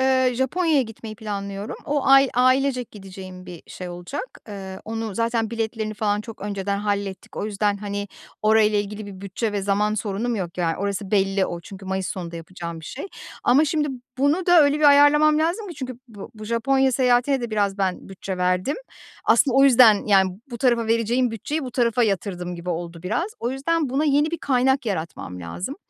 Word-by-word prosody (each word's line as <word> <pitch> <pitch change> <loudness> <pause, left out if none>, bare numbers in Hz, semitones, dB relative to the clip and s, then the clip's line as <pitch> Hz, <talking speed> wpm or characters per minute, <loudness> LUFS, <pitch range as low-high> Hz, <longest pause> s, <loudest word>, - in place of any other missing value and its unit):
eee, 260 -1 +3
Japonya'ya 295 +3 +2
gitmeyi 225 -1 -9
planlıyorum. 200 -1 -5
O 290 -2 -1
ay, 270 0 +7
ailecek 255 0 +2
gideceğim 185 -2 -10
bir 175 -2 -9
şey 180 - -8
olacak. 175 - -7
Eee, 190 -2 -7
onu 225 -2 -4
zaten 230 -1 0
biletlerini 220 -1 -3
falan 205 -1 0
çok 225 0 -10
önceden 200 0 -2
hallettik. 200 -2 -3
O - - -2
yüzden, 205 -1 0
hani, 205 0 -4 0.3
orayla 215 -1 +4
ilgili 205 +1 -4
bir 190 -2 -10
bütçe 200 +3 -3
ve 200 -1 -2
zaman 205 +2 +1
sorunum 215 +3 -2
yok, 180 -2 -5
yani, 165 -2 0
orası 200 0 -3
belli 195 -1 +2
o. 175 - -5
Çünkü 195 +2 -11
Mayıs 190 -1 -2
sonunda 170 -2 -5
yapacağım 170 -1 -7
bir - - -12
şey 285 - -6 0.4
ama, 275 +5 +5
şimdi, 300 0 0 0.3
bunu 300 +7 +2
da 350 -1 +7
öyle 285 +1 +2
bir 305 - +1
ayarlamam 290 +1 +6
lazım 355 +7 0
ki, 340 - -7
çünkü 255 -2 -6
bu 205 -3 -10
bu 215 - -9
Japonya 265 +4 +2
seyahatine 250 +1 +3
de 235 - -4
biraz 205 -2 0
ben 190 -1 -2
bütçe 190 0 -6
verdim. 180 +8 0 0.5
Aslında 270 -3 +4
o 275 - +7
yüzden, 235 -6 +6
yani, 190 -2 +4 0.2
bu 235 - -6
tarafa 235 -3 +2
vereceğim 230 +2 +1
bütçeyi 290 +8 -3
bu 255 - -5
tarafa 240 -1 +1
yatırdım 185 -4 -1
gibi 175 +1 -5
oldu 170 0 -5
biraz. 275 - -1
O 240 - -1
yüzden 295 +3 0
buna 280 +4 +1
yeni 295 +1 +3
bir 335 - -3
kaynak 265 -1 +1
yaratmam 160 - -4
lazım. 175 - -5
215 Hz, 190 wpm, -23 LUFS, 195-265 Hz, 0.5 s, ay